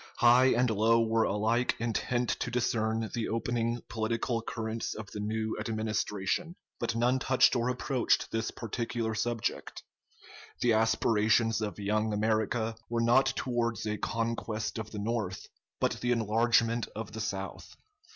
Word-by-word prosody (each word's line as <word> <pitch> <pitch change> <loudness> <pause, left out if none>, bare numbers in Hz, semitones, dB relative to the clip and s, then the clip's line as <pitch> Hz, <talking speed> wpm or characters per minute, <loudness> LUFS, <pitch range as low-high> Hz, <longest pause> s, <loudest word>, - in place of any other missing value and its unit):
High 120 +1 +6
and 125 0 +3
low 115 +2 +4
were 115 0 +2
alike 110 +5 +1
intent 120 +2 -1
to - - -2
discern 115 -2 0
the 115 -2 -2
opening 115 +1 -1
political 115 +1 -1
currents 110 0 -4
of 105 -1 -8
the 105 - -6
new 110 +1 -2
Administration, 110 - -2 0.2
but 115 -1 -1
none 125 +3 +2
touched 130 0 +4
or 120 0 +1
approached 125 0 0
this 110 0 -1
particular 115 0 -3
subject. 115 +1 -3 0.8
The 120 -2 +4
aspirations 110 0 +2
of 105 -1 -3
"Young 105 +1 0
America" 110 +1 0
were 120 0 0
not 120 +4 +4
towards 120 -3 -1
a 105 0 -2
conquest 115 -1 -2
of 110 -1 -5
the 110 - -8
North, 105 -3 -2 0.3
but - - 0
the 125 - +1
enlargement 115 +1 +2
of 110 +1 -5
the 110 - -5
South. 95 -2 -5
115 Hz, 140 wpm, -30 LUFS, 110-120 Hz, 0.8 s, High